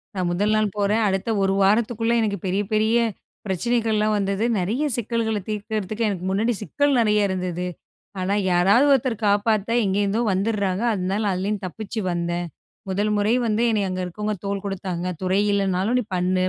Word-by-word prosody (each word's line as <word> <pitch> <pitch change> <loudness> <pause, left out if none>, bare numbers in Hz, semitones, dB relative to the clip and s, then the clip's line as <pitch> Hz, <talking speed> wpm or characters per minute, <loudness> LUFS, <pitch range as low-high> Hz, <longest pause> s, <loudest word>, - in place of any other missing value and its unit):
நான் 185 -2 -1
முதல் 205 +5 +1
நாள் 215 0 +2
போறேன். 210 +2 +2
அடுத்த 195 +3 -1
1 195 0 +2
வாரத்துக்குள்ள 225 +3 +2
எனக்குப் 200 -4 -2
பெரிய 190 +2 0
பெரிய 215 +2 +2 0.5
பிரச்சனைகள் 225 +4 0
எல்லாம் 215 0 +2
வந்தது. 200 +2 0
நிறைய 215 +11 -1
சிக்கல்களைத் 220 -3 -2
தீர்க்கறதுக்கு 215 +1 -2
எனக்கு 185 -3 -4
முன்னாடி 220 +5 +1
சிக்கல் 285 +6 +1
நிறைய 210 -2 +3
இருந்தது. 180 -2 -3 0.6
ஆனா 185 +2 0 0.2
யாராவது 195 +9 +4
ஒருத்தர் 245 -4 0
காப்பாத்தா 205 +1 +1
எங்கிருந்தோ 200 +3 +1
வந்துர்றாங்க. 200 0 0
அதனால 195 +2 -1
அப்படின்னு 200 +3 -2
தப்பிச்சு 215 +4 -5
வந்தேன். 175 0 -2 0.4
"முதல் 205 +3 0
முறை 205 +2 +2
வந்து 220 +1 +1
என்னை 210 -2 +1
அங்க 185 0 -3
இருக்கவங்க 210 +4 -3
தோள் 200 0 -2
கொடுத்தாங்க. 185 -2 -3
துறை 185 +2 +2
இல்லன்னாலும் 195 +3 +1
நீ - - -1
பண்ணு." 185 +1 +1
205 Hz, 155 wpm, -23 LUFS, 190-220 Hz, 0.6 s, யாராவது